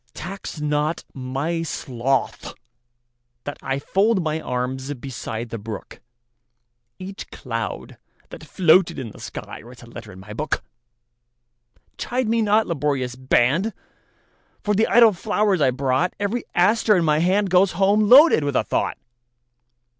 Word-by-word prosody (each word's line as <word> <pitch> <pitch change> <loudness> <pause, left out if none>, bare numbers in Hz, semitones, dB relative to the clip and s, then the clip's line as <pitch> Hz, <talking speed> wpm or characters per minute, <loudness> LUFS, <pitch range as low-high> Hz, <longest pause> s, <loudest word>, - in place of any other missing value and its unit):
Tax 195 -3 -7
not 150 +2 -1
my 135 +6 -3
sloth 135 -4 -2 0.9
that 145 - -6
IFold 190 +11 +1
my 155 0 -2
arms 130 +1 -3
beside 120 -3 -6
the 115 - -4
brook; 110 0 -8 1.0
Each 190 +1 -8
cloud 115 -3 -6 0.3
that - - -11
floated 175 0 +3
in 120 -5 -6
the - - -14
skyWrites 120 +1 -9
a - - -11
letter 115 -2 -11
in 95 - -12
my 105 +3 -10
book. 150 +8 -2 1.4
Chide 250 -1 -2
me 230 +1 +1
not, 215 +1 +3
laborious 140 -5 -2
band, 130 - +1 0.9
For 210 - +1
the 220 +2 +2
idle 230 -2 +6
flowers 205 -2 0
I 135 - +4
brought; 130 +5 0
Every 205 +4 -2
aster 210 +4 +3
in 170 - +1
my 150 -1 +2
handGoes 185 +1 +3
home 205 +3 +2
loaded 275 - +7
with 145 -2 -2
a - - +3
thought. - - -1
155 Hz, 130 wpm, -22 LUFS, 130-200 Hz, 1.4 s, loaded